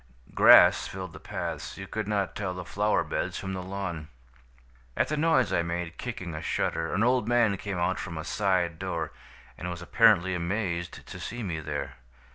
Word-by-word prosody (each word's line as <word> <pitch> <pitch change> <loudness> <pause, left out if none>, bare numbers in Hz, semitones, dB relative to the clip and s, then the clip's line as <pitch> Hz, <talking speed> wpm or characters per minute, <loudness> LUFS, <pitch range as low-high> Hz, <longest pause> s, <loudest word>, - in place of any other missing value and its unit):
Grass - - +7
filled 95 -3 -7
the - - -10
paths; - - -5
you 95 - -6
could 105 +1 -4
not 100 -2 -1
tell 95 -3 -3
the 90 -1 -6
flower 105 +3 +1
beds - - -3
from 95 -1 -4
the 95 - -4
lawn. 90 -4 -5 0.9
"At - - +2
the 155 - 0
noise 150 -6 +3
I - - +3
made 85 0 -4
kicking 95 -9 -5
a 75 - -5
shutter, 80 0 -1
an 100 +5 +1
old 125 -2 +2
man 120 -4 +3
came 100 -1 -4
out 90 +1 0
from 85 -4 -5
a 80 - -4
side 90 -3 0
door 85 -4 -3 0.5
and 90 - -4
was 90 0 -6
apparently 95 -2 +4
amazed 85 -1 -3
to - - -9
see 120 +2 -5
me 85 -5 -3
there. 75 -2 -5
95 Hz, 190 wpm, -28 LUFS, 85-105 Hz, 0.9 s, Grass